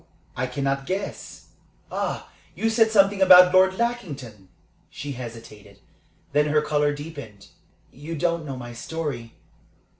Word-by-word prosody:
I 130 - -2
cannot 135 +1 -2
guess. 190 +2 -5 0.4
Ah, - - -3 0.2
you 225 0 0
said 225 0 +4
something 200 -2 +3
about 180 -1 +8
Lord 190 0 +5
Lackington?" 145 - -4 0.4
She 145 - -7
hesitated. 115 -5 -10 0.6
Then 150 +1 +3
her 150 0 +2
color 150 -1 +1
deepened. 145 -9 -9 0.4
"You 150 +5 -7
don't 170 +1 0
know 135 -3 -6
my 120 -1 -8
story. 130 -3 -5
145 Hz, 125 wpm, -24 LUFS, 125-185 Hz, 0.6 s, about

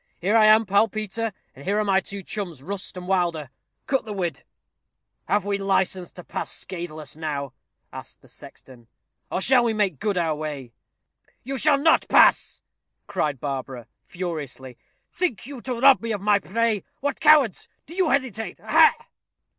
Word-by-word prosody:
Here 200 +6 +1
I 215 -1 +6
am, 215 +1 +6
pal 200 +3 +3
Peter; 215 +1 -3 0.2
and 135 - -12
here 200 +5 0
are 215 - +2
my 195 -2 +3
two 200 0 -7
chums, 175 -9 -6
Rust 190 +2 -5
and 180 0 -7
Wilder. 170 -7 0 0.3
Cut 270 -1 0
the 215 - -6
whid." 175 -7 -3 0.9
"Have 205 -2 +1
we 200 0 -1
license 190 -2 0
to 180 - -11
pass - - -4
scathless 155 -5 -6
now?" 145 -4 -4 0.4
asked - - -9
the - - -18
sexton; 120 -3 -14 0.4
"or 185 - -1
shall 250 +3 +4
we 230 -2 +1
make 200 -9 0
good 205 -3 -1
our 165 -3 +1
way?" 145 -5 -6 0.7
"You 270 +1 -4
shall 295 +1 +4
not 320 +3 +3
pass," - - +4 0.4
cried 155 -9 -2
Barbara, 130 -3 -5 0.2
furiously. 150 -8 -6 0.4
"Think 335 - -1
you 270 -2 -9
to 250 -2 -4
rob 270 +1 +6
me 230 -1 -2
of 205 - -4
my 205 0 +3
prey? 220 +1 -1 0.2
What, 285 0 -2
cowards! 300 - +4 0.2
do 325 - -11
you 365 -2 +1
hesitate? 255 -6 -1
Ha!" - - +5
195 Hz, 170 wpm, -24 LUFS, 160-225 Hz, 0.9 s, I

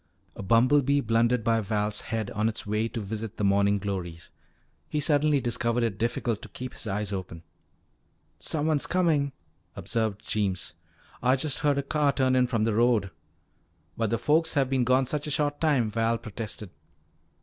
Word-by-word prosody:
A - - -7
bumblebee 130 +7 +3
blundered 115 0 +2
by 115 -1 +2
Val's 105 0 -1
head 110 -3 -3
on 105 +2 0
its 110 - -5
way 105 +2 0
to 115 - -5
visit 110 +1 -5
the - - -2
morning 100 +1 +3
glories. 90 -4 -5 0.6
He 150 - -1
suddenly 150 0 +3
discovered 120 -1 0
it 110 -4 -2
difficult 115 -1 -1
to 115 - -10
keep 125 +4 -7
his - - -5
eyes 105 0 -2
open. 90 -3 -6 1.0
"Someone's 155 -1 +1
comin'," 160 -6 +2 0.4
observed 110 -3 -2
Jeems. 95 -5 -1 0.5
"Ah 125 +2 +4
just 145 +1 -1
heard 145 -2 +2
a 140 - 0
car 145 0 +1
turn 130 -1 +2
in 125 -1 +3
from 115 -3 0
the 110 0 +1
road." 110 -4 +2 0.8
"But 115 -2 -1
the 115 - +1
folks 160 +6 +2
have 135 -2 +1
been 130 -2 +2
gone 130 +2 +3
such 145 +3 -3
a - - -3
short 145 0 0
time," 135 -9 +2
Val 115 +1 +1
protested. 110 -3 -7
115 Hz, 170 wpm, -27 LUFS, 105-140 Hz, 1.0 s, Ah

